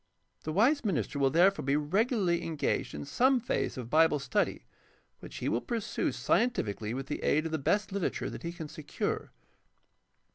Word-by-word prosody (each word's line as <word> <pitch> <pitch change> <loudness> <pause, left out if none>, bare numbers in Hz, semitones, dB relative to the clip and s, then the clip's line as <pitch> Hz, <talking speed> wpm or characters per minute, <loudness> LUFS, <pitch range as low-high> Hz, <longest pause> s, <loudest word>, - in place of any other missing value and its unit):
The 155 - -2
wise 245 - +3
minister 165 -8 -1
will 135 -1 +4
therefore 180 +7 +4
be 140 +1 +1
regu 170 +10 +2
larly 175 -4 +1
engaged 160 - -1
in 75 0 -5
some 260 - +3
phase 235 - -2
of 120 -2 -6
Bible 160 -1 +5
study, 140 - -1 0.5
which - - -11
he - - -3
will 115 - +1
pursue 230 -3 -2
scientifically 115 - 0
with 135 +1 -4
the - - -4
aid 155 +2 +2
of 165 - -3
the 160 - -1
best 200 +9 +1
literature 195 -2 -2
that - - -7
he 170 - -4
can 170 -3 -7
secure. 155 -1 -4
160 Hz, 180 wpm, -30 LUFS, 140-200 Hz, 0.5 s, Bible